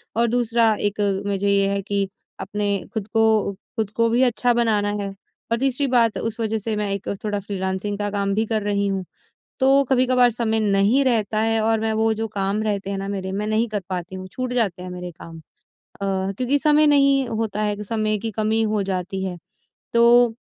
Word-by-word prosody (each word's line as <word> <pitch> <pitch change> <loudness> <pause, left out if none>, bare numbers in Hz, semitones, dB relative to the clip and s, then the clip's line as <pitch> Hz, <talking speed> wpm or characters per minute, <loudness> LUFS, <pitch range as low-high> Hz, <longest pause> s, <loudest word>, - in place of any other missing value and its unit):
और 235 +1 +2
दूसरा 230 -1 +2
एक 205 +1 -1 0.3
मुझे 200 0 -1
ये 200 0 +3
है 200 0 -1
कि 200 0 -1 0.3
अपने 205 0 -3 0.3
खुद 215 -3 -3
को 220 -2 +3 0.2
खुद 220 -3 0
को 230 0 +2
भी 235 +2 +2
अच्छा 245 0 +2
बनाना 220 -3 +1
है 200 - -3 0.4
और 230 - +2
तीसरी 270 +1 +1
बात 235 -3 +3
उस 225 0 -4
वज़ह 220 -1 0
से 215 +1 -3
मैं 210 -1 -1
एक 200 -1 -4 0.2
थोड़ा 205 -1 -1
फ़्रीलेंसिंग 190 0 -3
का 205 - -1
काम 200 -1 0
भी 220 +2 +1
कर 220 -1 -1
रही 200 -1 0
हूँ, 195 -1 -1 0.6
तो 270 +1 +5
कभी-कभार 250 -1 +4
समय 220 -1 0
नहीं 210 +5 +3
रहता 220 -3 +1
है 225 0 +2
और 225 0 +2
मैं 220 0 0
वो 220 0 +2
जो 225 +1 -3
काम 200 0 -1
रहते 200 -2 -2
हैं 200 - -2
ना 195 0 -4
मेरे 190 -1 -4
मैं 205 +2 -2
नहीं 220 +2 +1
कर 210 -2 -2
पाती 180 0 -4
हूँ, 185 0 -7
छूट 255 -1 -3
जाते 200 -7 0
हैं 180 - -6
मेरे 180 0 -6
काम। 165 0 -12
अ, - - -15 0.6
क्योंकि 195 +8 0
समय 300 +1 +4
नहीं 275 -2 +4
होता 220 -2 -2
है 210 -1 0
कि 210 - -7
समय 215 0 -1
की 225 +2 -4
कमी 220 +2 0
हो 215 -2 0
जाती 190 0 -3
है 180 -2 -4 0.6
तो 235 0 +5
215 Hz, 210 wpm, -22 LUFS, 200-230 Hz, 0.6 s, तो